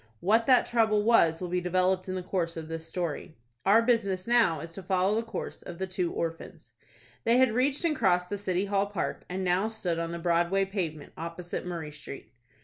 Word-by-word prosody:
What 225 Hz, +5 st, +2 dB
that 255 Hz, -2 st, +6 dB
trouble 220 Hz, -3 st, +2 dB
was 170 Hz, -8 st, +4 dB
will 180 Hz, -, -4 dB
be 180 Hz, +1 st, -1 dB
developed 185 Hz, +1 st, +1 dB
in 185 Hz, -, -2 dB
the 185 Hz, -, -4 dB
course 170 Hz, -3 st, -2 dB
of 160 Hz, -1 st, -6 dB
the 165 Hz, 0 st, -3 dB
story. 165 Hz, -1 st, -5 dB, 0.3 s
Our 220 Hz, +4 st, +6 dB
business 200 Hz, -6 st, +1 dB
now 230 Hz, -10 st, +3 dB
is 165 Hz, +2 st, -7 dB
to 195 Hz, -, -7 dB
follow 190 Hz, +1 st, +1 dB
the 225 Hz, -, +1 dB
course 230 Hz, -, -6 dB
of 175 Hz, -, -9 dB
the 190 Hz, -, -2 dB
two 185 Hz, -2 st, -2 dB
orphans. 165 Hz, 0 st, -5 dB, 0.5 s
They 235 Hz, +2 st, +4 dB
had 260 Hz, -2 st, +5 dB
reached 265 Hz, +7 st, +1 dB
and 315 Hz, -2 st, +2 dB
crossed 180 Hz, -4 st, +1 dB
the 205 Hz, -, -2 dB
City 190 Hz, -1 st, 0 dB
Hall 200 Hz, 0 st, +1 dB
Park, 200 Hz, -3 st, -4 dB
and 185 Hz, +1 st, -3 dB
now 185 Hz, +3 st, +2 dB
stood 180 Hz, -7 st, -2 dB
on 165 Hz, 0 st, -3 dB
the 170 Hz, -, -4 dB
Broadway 175 Hz, +3 st, +1 dB
pavement, 170 Hz, -7 st, -4 dB
opposite 170 Hz, +2 st, -5 dB
Murray 165 Hz, -4 st, -5 dB
Street. 140 Hz, -6 st, -10 dB
185 Hz, 210 wpm, -28 LUFS, 170-210 Hz, 0.5 s, that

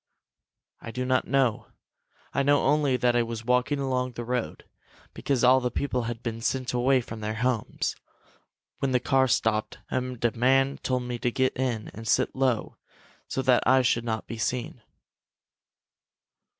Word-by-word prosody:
"I -, -, -8 dB
do 125 Hz, +2 st, -3 dB
not 130 Hz, 0 st, +1 dB
know. 130 Hz, -4 st, +1 dB, 0.7 s
I -, -, +1 dB
know 145 Hz, +1 st, +3 dB
only 145 Hz, -2 st, +2 dB
that 125 Hz, 0 st, +2 dB
I 120 Hz, -, +4 dB
was 115 Hz, -1 st, -5 dB
walking 125 Hz, +4 st, +2 dB
along 130 Hz, -2 st, -1 dB
the 120 Hz, -, -5 dB
road, 125 Hz, 0 st, -3 dB, 0.5 s
because 135 Hz, -4 st, -1 dB
all 130 Hz, +1 st, +6 dB
the 125 Hz, -1 st, -1 dB
people 125 Hz, 0 st, -2 dB
had 115 Hz, 0 st, -5 dB
been 115 Hz, -1 st, -4 dB
sent 130 Hz, +1 st, -1 dB
away 130 Hz, +2 st, +3 dB
from 110 Hz, -1 st, -8 dB
their 110 Hz, 0 st, -3 dB
homes, 120 Hz, -2 st, -1 dB, 0.8 s
when 135 Hz, -1 st, 0 dB
the 125 Hz, -, +4 dB
car 130 Hz, +1 st, +2 dB
stopped, 110 Hz, -2 st, 0 dB
and 125 Hz, -2 st, -2 dB
a 120 Hz, -, +3 dB
man 135 Hz, +3 st, +2 dB
told 125 Hz, -1 st, -1 dB
me 125 Hz, -1 st, -4 dB
to 120 Hz, -, 0 dB
get 130 Hz, +2 st, 0 dB
in 120 Hz, -4 st, -2 dB
and 115 Hz, +1 st, -8 dB
sit -, -, +1 dB
low, 130 Hz, -4 st, 0 dB, 0.5 s
so 135 Hz, -, -2 dB
that 125 Hz, -2 st, +4 dB
I 130 Hz, +1 st, +5 dB
should 120 Hz, -1 st, +1 dB
not 110 Hz, -2 st, -3 dB
be 115 Hz, -, -7 dB
seen. 120 Hz, +1 st, -3 dB
125 Hz, 170 wpm, -27 LUFS, 115-130 Hz, 0.8 s, all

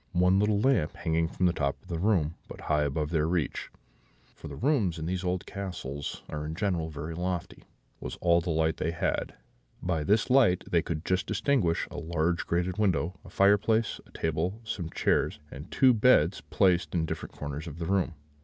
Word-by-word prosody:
One 90 Hz, +2 st, +4 dB
little 105 Hz, 0 st, +2 dB
lamp, 130 Hz, -, +2 dB
hanging 80 Hz, 0 st, 0 dB
from 90 Hz, -, -1 dB
the 90 Hz, -, +3 dB
top 70 Hz, -4 st, -1 dB
of -, -, -23 dB
the 85 Hz, -3 st, -3 dB
room, 90 Hz, -5 st, +2 dB
but -, -, -10 dB
high 75 Hz, -, +1 dB
above 75 Hz, +1 st, -1 dB
their 80 Hz, -2 st, +1 dB
reach 85 Hz, -2 st, -1 dB, 0.6 s
(for -, -, -10 dB
the -, -, -7 dB
rooms 115 Hz, -, +1 dB
in 80 Hz, -, -4 dB
those 90 Hz, +2 st, -2 dB
old 90 Hz, 0 st, -1 dB
castles 80 Hz, -8 st, -5 dB
are 75 Hz, -1 st, -4 dB
in 80 Hz, +1 st, -4 dB
general 90 Hz, -4 st, -1 dB
very 80 Hz, +2 st, -6 dB
lofty), 90 Hz, 0 st, -4 dB, 0.3 s
was -, -, -6 dB
all 85 Hz, -1 st, +3 dB
the 90 Hz, -, -5 dB
light 80 Hz, 0 st, +1 dB
they 80 Hz, -, -1 dB
had: 85 Hz, -, -2 dB, 0.4 s
by 85 Hz, -4 st, -1 dB
this 105 Hz, -, +2 dB
light 120 Hz, -9 st, +5 dB
they 85 Hz, -, +2 dB
could 80 Hz, 0 st, -4 dB
just 95 Hz, 0 st, 0 dB
distinguish 105 Hz, -, +1 dB
a 85 Hz, -, -7 dB
large 85 Hz, +1 st, -1 dB
grated 90 Hz, +3 st, -1 dB
window, 90 Hz, -3 st, +1 dB
a 95 Hz, -, -12 dB
fireplace, 105 Hz, +4 st, +3 dB
a -, -, -21 dB
table, 80 Hz, +6 st, -2 dB
some 90 Hz, -6 st, -4 dB
chairs, -, -, +1 dB
and 70 Hz, +3 st, -9 dB
two 130 Hz, -2 st, +5 dB
beds 105 Hz, -7 st, +4 dB
placed 90 Hz, -3 st, +2 dB
in 80 Hz, -2 st, +1 dB
different -, -, -6 dB
corners 75 Hz, +2 st, -5 dB
of 75 Hz, -1 st, -7 dB
the 85 Hz, -, -4 dB
room. 95 Hz, -2 st, 0 dB
85 Hz, 195 wpm, -28 LUFS, 80-95 Hz, 0.6 s, light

